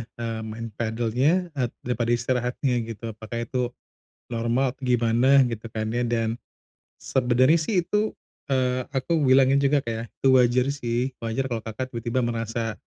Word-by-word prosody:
eee, 115 -1 -4
main 110 +1 -6
padelnya, 120 +10 +1
e 125 -2 +1 0.2
daripada 120 -1 -1
istirahatnya, 125 +2 -1
gitu, 115 0 -6
apakah 110 +2 -5
itu 125 +1 -1 0.6
normal 120 +3 +1
atau 135 - -17
gimana, 125 +3 +4
gitu 115 -2 -4
kan 110 0 -3
ya? 120 +1 0
Dan, 115 0 -1 0.6
sebenernya 130 +4 +3
sih 180 +3 +1
itu, 210 +5 0 0.4
eee, 130 -1 +1
aku 135 +6 0
bilangnya 135 +1 +5
juga 140 0 +3
kayak, 115 -1 -5
itu - - -1
wajar 125 +1 +4
sih, 125 -2 -1 0.2
wajar 130 +4 -1
kalau 115 -2 -2
Kakak 120 +4 -4
tiba-tiba 120 +1 -2
merasa, 115 -1 -2
120 Hz, 150 wpm, -25 LUFS, 115-130 Hz, 0.6 s, bilangnya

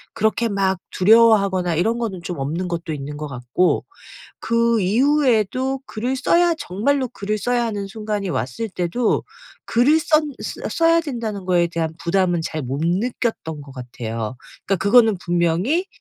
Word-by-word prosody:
그렇게 220 +2 +1
막 190 -2 0
두려워하거나 200 -4 +4
이런 225 +8 +1
거는 195 -6 -3
좀 175 -4 -5
없는 160 +7 -2
것도 170 -2 -4
있는 145 0 -6
것 150 - -5
같고 125 +7 0 0.6
그 230 -1 +2
이후에도 260 +2 +2
글을 245 +4 -3
써야 345 +6 +3
정말로 260 - 0
글을 215 -2 -3
써야 245 +2 0
하는 205 -3 -3
순간이 210 -1 -4
왔을 130 - -3
때도 185 +6 0 0.4
글을 275 +7 +4
썬 305 -2 +2
쓰 - - -6
써야 330 0 +3
된다는 230 - -5
거에 175 -2 +2
대한 165 -1 -3
부담은 175 0 +1
잘 155 -1 -3
못 135 +4 -4
느꼈던 180 - -2
것 140 - -12
같아요. 120 -2 -5 0.3
그러니까 195 - +2
그거는 220 0 +5
분명히 175 - 0
200 Hz, 315 characters per minute, -21 LUFS, 170-240 Hz, 0.6 s, 그거는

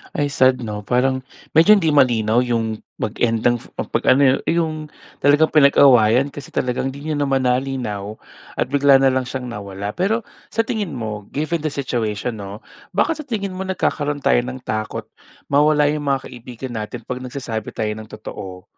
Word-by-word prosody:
Ay, 145 0 0
sad 130 -2 +3
'no. 105 -2 -5
Parang 130 +3 +1 0.3
medyo 165 +7 +7
hindi 165 -6 +2
malinaw 120 -5 +3
yung 115 -2 -1 0.2
mag-end 115 +1 0
ng 120 0 +3 0.3
'pag - - 0
ano 135 +2 +6
yung 135 0 +5
yung 165 -1 +1 0.5
talagang 145 +2 +4
pinag-awayan 135 -3 +5
kasi 145 - -10
talagang 125 +1 -1
hindi 140 +3 -8
niyo - - 0
naman 135 -2 +1
nalinaw 125 -5 -1 0.4
at - - 0
bigla 140 -1 +5
na 135 -1 +4
lang 130 0 0
siyang 125 -1 -5
nawala. 100 -2 -5
Pero 215 +6 +1 0.3
sa 225 - +3
tingin 210 -6 -3
mo, 105 -4 -5
given 155 +3 -1
the 155 - -1
situation 115 -4 -2
'no, 100 +2 -8 0.3
bakit 310 +10 +1
sa 305 - -6
tingin 200 -5 -3
mo 190 - -3
nagkakaroon 145 -6 -1
tayo - - +4
ng 130 0 -6
takot 110 -2 -4 0.4
mawala 150 +1 +4
yung 150 -1 -3
mga 135 -1 0
kaibigan 125 0 -8
natin 110 +3 -5
'pag 125 +3 -5
nagsasabi 125 -4 -5
tayo 105 -1 -2
ng 110 0 -9
totoo? 95 -3 -8
130 Hz, 175 wpm, -20 LUFS, 110-145 Hz, 0.5 s, medyo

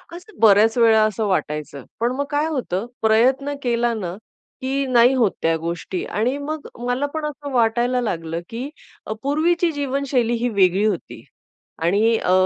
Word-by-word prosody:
असं 375 +5 -13
बऱ्याच 220 +2 +5
वेळा 225 -2 +5
असं 215 0 0
वाटायचं. 150 -7 -2 0.2
पण 235 +2 +1
मग 285 +1 -1
काय 295 +2 +1
होतं, 240 - -2 0.2
प्रयत्न 255 +6 +3
केला 240 -1 +1
ना, 185 -5 -4 0.5
की 270 +1 -1
नाही 245 0 +5
होत 235 -7 +2
त्या 165 0 +2
गोष्टी. 170 +3 -4
आणि 245 +6 -1
मग 300 +1 -5 0.2
मला 250 +3 0
पण 315 -1 -3
असं 290 -1 -6
वाटायला 240 +1 +2
लागलं, 165 -7 -3
की 245 +5 -5 0.4
अ, 215 - -3
पूर्वीची 335 +4 +1
जीवनशैली 275 -4 -1
ही 245 - +2
वेगळी 195 -1 +3
होती. 205 -6 -3 0.6
आणि 210 +7 +3
अ, 180 - 0
235 Hz, 160 wpm, -21 LUFS, 205-275 Hz, 0.6 s, बऱ्याच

